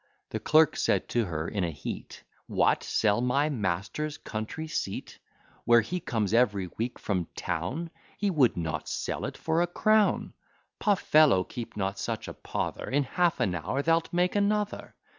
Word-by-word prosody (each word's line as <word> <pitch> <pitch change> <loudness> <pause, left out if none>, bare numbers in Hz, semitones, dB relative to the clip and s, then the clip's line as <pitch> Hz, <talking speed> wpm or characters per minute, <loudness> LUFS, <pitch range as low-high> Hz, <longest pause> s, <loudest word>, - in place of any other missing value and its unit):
The - - -2
clerk 155 0 +4
said - - +1
to 120 -2 +1
her 80 -3 -3
in 100 -3 -2
a 85 - 0
heat, 70 -4 -7 0.2
What! - - +2
sell 105 +1 +2
my 140 +4 +2
master's 105 - -2
country 110 +9 -5
seat, 100 -10 -4 0.4
Where 120 0 +6
he 180 +11 -3
comes 110 - -1
every 105 -7 +2
week 120 +2 -3
from 90 -5 -2
town! 115 - -3 0.3
He 205 -1 +1
would 135 - +3
not 80 -2 -3
sell - - -3
it - - -5
for 160 +1 +1
a 175 - +2
crown. 215 +4 +2 0.5
Poh! 205 -2 +3
fellow, 150 - +4
keep 115 +2 -8
not 95 0 -2
such - - -3
a - - -6
pother; - - -4
In 140 +2 +2
half 175 +6 +1
an 95 - +1
hour 90 - -2
thou'lt 165 +1 +2
make 180 +2 +1
another. 205 0 0
125 Hz, 170 wpm, -28 LUFS, 95-165 Hz, 0.5 s, Where